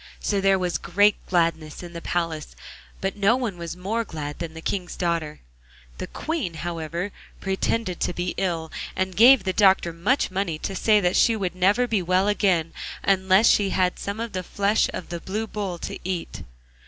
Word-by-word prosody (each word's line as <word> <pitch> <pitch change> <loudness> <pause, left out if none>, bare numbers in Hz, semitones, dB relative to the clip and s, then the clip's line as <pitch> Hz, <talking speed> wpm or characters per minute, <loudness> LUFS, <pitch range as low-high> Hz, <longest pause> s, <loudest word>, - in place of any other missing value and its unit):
So 200 -2 0
there 195 0 +4
was 180 -2 -1
great 205 +4 +4
gladness 165 -3 0
in 175 -1 -9
the 170 - -6
palace, 165 -3 -3 0.5
but 195 0 -1
no 205 +3 +3
one 240 -7 -2
was 170 0 -5
more 215 +6 -1
glad 150 -7 -6
than 165 -2 -5
the - - -7
King's 180 +1 -3
daughter. 165 -3 -2 0.6
The - - -4
Queen, 300 - -3
however, 170 +3 -4 0.3
pretended 190 0 -1
to - - 0
be 175 0 -3
ill, 170 -4 -2 0.2
and 185 -1 -1
gave 240 +1 +7
the 190 -1 -1
doctor 190 -4 +4
much 190 - +1
money 185 -4 -1
to 195 - -4
say 210 +2 +4
that 180 0 +1
she 230 - +4
would 190 -5 -2
never 200 +7 +3
be 220 -5 0
well 185 +3 +2
again 185 -6 +1 0.3
unless 190 +2 +4
she 200 -2 +4
had 180 -1 +1
some 200 +2 -4
of 230 -1 -3
the 185 - -2
flesh 200 +3 +1
of - - -7
the 170 -1 -4
Blue 210 +6 -3
Bull 200 -5 -4
to - - -6
eat. 180 -2 -4
185 Hz, 190 wpm, -24 LUFS, 170-205 Hz, 0.6 s, gave